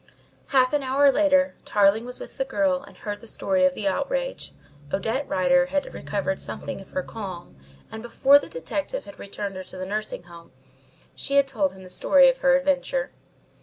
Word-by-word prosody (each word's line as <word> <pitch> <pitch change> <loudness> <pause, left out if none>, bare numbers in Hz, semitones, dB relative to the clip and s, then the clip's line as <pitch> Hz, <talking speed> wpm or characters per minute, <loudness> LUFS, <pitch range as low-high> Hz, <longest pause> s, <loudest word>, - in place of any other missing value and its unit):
Half 260 -1 +3
an 295 - +2
hour 275 +1 +4
later 280 -1 +3
Tarling 205 +2 +3
was 250 0 -7
with - - -10
the - - +2
girl 275 0 0
and 280 - -15
heard 205 -1 -6
the 230 - -13
story 280 +5 +1
of 275 -1 +2
the - - -2
outrage. - - -2 0.4
Odette 225 +8 -1
Rider 265 +9 +3
had 285 +1 -2
recovered 190 +6 -3
something - - -6
of 195 - -15
her 185 - -1
calm, 185 - -8 0.4
and 220 - -7
before 270 +4 +5
the - - -10
detective - - -4
had 300 - -12
returned 200 -1 -6
her 185 - -6
to 185 - -10
the 185 - -4
nursing 210 -2 -4
home 170 -4 -15 0.6
she 280 - -3
had 280 -1 +5
told 200 -8 0
him 190 0 -13
the - - -11
story 270 +8 +5
of 260 - -1
her 270 0 +5
adventure. 285 - -1
265 Hz, 195 wpm, -25 LUFS, 200-280 Hz, 0.6 s, before